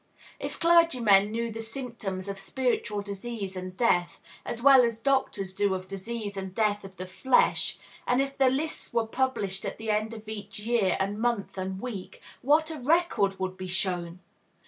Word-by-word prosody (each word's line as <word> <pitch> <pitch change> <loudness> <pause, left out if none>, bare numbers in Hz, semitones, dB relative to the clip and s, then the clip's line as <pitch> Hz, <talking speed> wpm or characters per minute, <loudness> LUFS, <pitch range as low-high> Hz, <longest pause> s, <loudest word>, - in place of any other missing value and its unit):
If - - -5
clergymen 255 -13 +5
knew 230 +1 -2
the 225 +1 -5
symptoms 225 -6 -5
of 195 -1 -5
spiritual 210 -1 -1
disease 200 -1 -5
and 185 0 -6
death, 175 -7 +2 0.2
as 235 - -4
well 270 -2 +9
as 230 -2 0
doctors 225 -7 0
do 200 0 +1
of 185 0 -6
disease 200 +2 -5
and 190 -1 -6
death 210 -2 +1
of 190 -1 -11
the 185 - -5
flesh, 245 +8 +2 0.3
and 245 +1 +3
if 275 0 -1
the 265 -1 +4
lists 290 +2 -2
were 230 -1 +3
published 220 -6 -1
at - - -5
end 215 0 0
of 220 -1 -11
each 205 -2 -7
year 210 -3 +1
and 200 +2 -1
month 225 -5 0
and 190 0 -4
week, 210 -5 -6 0.2
what 310 +4 +3
a 310 - -6
record 270 - +2
would 185 0 -2
be 185 0 -5
shown! 180 -1 -2
210 Hz, 175 wpm, -28 LUFS, 195-245 Hz, 0.3 s, well